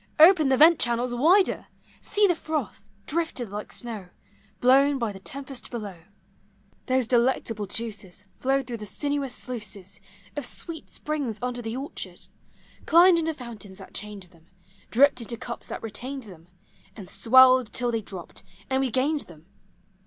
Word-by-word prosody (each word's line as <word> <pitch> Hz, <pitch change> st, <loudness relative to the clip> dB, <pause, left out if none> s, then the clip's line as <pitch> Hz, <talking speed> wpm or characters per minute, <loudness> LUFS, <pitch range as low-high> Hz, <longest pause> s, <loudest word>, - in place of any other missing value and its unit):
Open 320 Hz, -2 st, +7 dB
the 265 Hz, -, +3 dB
vent 320 Hz, +3 st, +7 dB
channels 240 Hz, +1 st, 0 dB
wider! 345 Hz, +11 st, +3 dB, 0.3 s
See 415 Hz, 0 st, +2 dB
the 365 Hz, -, +4 dB
froth, 310 Hz, -, -4 dB, 0.2 s
drifted 290 Hz, -, -2 dB
like 210 Hz, +1 st, -6 dB
snow, 220 Hz, -6 st, -6 dB, 0.5 s
Blown 275 Hz, +3 st, +5 dB
by 230 Hz, -4 st, -1 dB
the 195 Hz, -, -10 dB
tempest 270 Hz, +5 st, -7 dB
below! 205 Hz, -7 st, -6 dB, 0.9 s
Those 260 Hz, -1 st, +2 dB
delectable 235 Hz, -3 st, +1 dB
juices 205 Hz, -2 st, -5 dB
Flowed 270 Hz, +1 st, 0 dB
through 240 Hz, -2 st, -5 dB
the 210 Hz, -1 st, -8 dB
sinuous 285 Hz, +2 st, -2 dB
sluices 205 Hz, -7 st, -5 dB, 0.3 s
Of 290 Hz, -, -3 dB
sweet 320 Hz, +6 st, -6 dB
springs 285 Hz, -8 st, -3 dB
under 245 Hz, 0 st, -3 dB
the 225 Hz, +1 st, -4 dB
orchard; 275 Hz, +2 st, -7 dB, 0.7 s
Climbed 340 Hz, +1 st, +7 dB
into 320 Hz, -1 st, -1 dB
fountains 215 Hz, -7 st, -9 dB
that -, -, -11 dB
chained 210 Hz, -2 st, -5 dB
them; 170 Hz, -2 st, -17 dB, 0.4 s
Dripped 260 Hz, +1 st, +4 dB
into 235 Hz, +1 st, -4 dB
cups 235 Hz, +1 st, -7 dB
that -, -, -6 dB
retained 250 Hz, +5 st, -5 dB
them, 175 Hz, -6 st, -14 dB, 0.5 s
And 195 Hz, -4 st, -9 dB
swelled 255 Hz, +1 st, +5 dB
till 245 Hz, 0 st, 0 dB
they 225 Hz, -1 st, -1 dB
dropped, 190 Hz, -4 st, -9 dB, 0.3 s
and 265 Hz, -, +2 dB
we 265 Hz, -, +1 dB
gained 280 Hz, +5 st, +1 dB
them. 160 Hz, -2 st, -15 dB
245 Hz, 155 wpm, -26 LUFS, 210-280 Hz, 0.9 s, Open